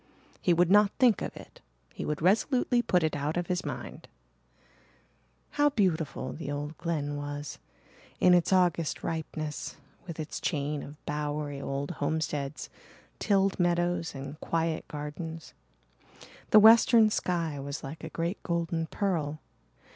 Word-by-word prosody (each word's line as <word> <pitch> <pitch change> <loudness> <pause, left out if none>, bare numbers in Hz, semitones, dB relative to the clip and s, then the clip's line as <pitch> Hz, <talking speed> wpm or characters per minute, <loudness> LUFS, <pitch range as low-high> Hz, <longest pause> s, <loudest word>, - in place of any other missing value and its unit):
He 180 - +2
would 175 +1 +3
not 205 0 +6
think 250 -5 +4
of - - -5
it - - -13 0.3
he - - -5
would 150 0 -3
resolutely 240 +6 +3
put 180 -7 +2
it 155 -2 0
out 145 +3 -2
of 175 - 0
his 180 0 -1
mind. - - -7 1.4
How 290 0 +3
beautiful 180 - -1
the 155 -2 -6
old 145 +2 -4
Glen 150 -4 -2
was, 145 0 -6 0.6
in 180 - +6
its 175 0 +3
August 175 -4 +2
ripeness, 155 -2 -4 0.3
with 165 -2 -7
its 155 -1 -5
chain 145 -2 -1
of 145 +1 -12
bowery 145 -1 -3
old 140 +3 -3
homesteads, 150 -2 -2 0.5
tilled 195 -2 +2
meadows 175 -2 +1
and 140 +3 -7
quiet 165 -1 -1
gardens. 155 +2 -7 1.0
The 215 - +8
western 225 0 +7
sky 165 -7 -1
was 140 +1 -5
like 145 +4 -8
a - - -5
great 170 +4 -3
golden 170 -1 -1
pearl. 155 -6 -1
165 Hz, 140 wpm, -29 LUFS, 150-180 Hz, 1.4 s, The